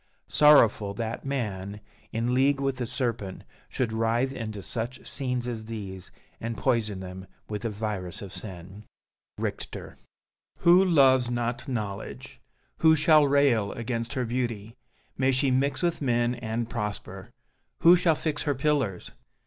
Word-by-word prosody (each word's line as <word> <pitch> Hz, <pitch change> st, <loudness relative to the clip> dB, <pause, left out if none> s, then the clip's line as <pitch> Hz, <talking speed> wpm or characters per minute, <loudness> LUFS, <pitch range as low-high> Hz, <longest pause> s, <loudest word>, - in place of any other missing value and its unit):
Sorrowful 115 Hz, -9 st, +5 dB
that 115 Hz, +3 st, -4 dB
man, 105 Hz, -7 st, -3 dB, 0.3 s
in 115 Hz, +2 st, -1 dB
league 135 Hz, +2 st, +3 dB
with 135 Hz, -1 st, -1 dB
the 125 Hz, -2 st, -3 dB
serpent, 115 Hz, -7 st, -3 dB, 0.3 s
should 120 Hz, -4 st, -2 dB
writhe 115 Hz, +4 st, +1 dB
into 110 Hz, -5 st, -5 dB
such 120 Hz, +5 st, -4 dB
scenes 125 Hz, -3 st, -2 dB
as 115 Hz, -3 st, -4 dB
these, 100 Hz, -5 st, -6 dB, 0.3 s
and 115 Hz, 0 st, -4 dB
poison 110 Hz, -7 st, 0 dB
them 95 Hz, +1 st, -8 dB, 0.2 s
with 105 Hz, -1 st, -4 dB
the 115 Hz, -, -2 dB
virus 105 Hz, -4 st, -4 dB
of 95 Hz, -, -9 dB
sin. 95 Hz, 0 st, -7 dB, 0.5 s
Richter -, -, -5 dB, 0.6 s
Who 175 Hz, +2 st, +7 dB
loves 135 Hz, -8 st, +4 dB
not 120 Hz, +2 st, -2 dB
Knowledge? 105 Hz, -6 st, -5 dB, 0.4 s
Who 160 Hz, -1 st, +5 dB
shall 150 Hz, -1 st, +5 dB
rail 135 Hz, -7 st, +3 dB
Against 115 Hz, +1 st, -3 dB
her 130 Hz, -3 st, -1 dB
beauty? 115 Hz, -2 st, -3 dB, 0.4 s
May 135 Hz, 0 st, +3 dB
she 130 Hz, +1 st, +1 dB
mix 135 Hz, +4 st, +1 dB
With 170 Hz, -2 st, 0 dB
men 120 Hz, -2 st, +1 dB
and 115 Hz, -1 st, -3 dB
prosper! 105 Hz, -3 st, -5 dB, 0.5 s
Who 170 Hz, +2 st, +8 dB
shall 175 Hz, -3 st, +3 dB
fix 150 Hz, -1 st, -2 dB
Her 145 Hz, -2 st, 0 dB
pillars? 130 Hz, -9 st, 0 dB
120 Hz, 140 wpm, -27 LUFS, 105-135 Hz, 0.6 s, Who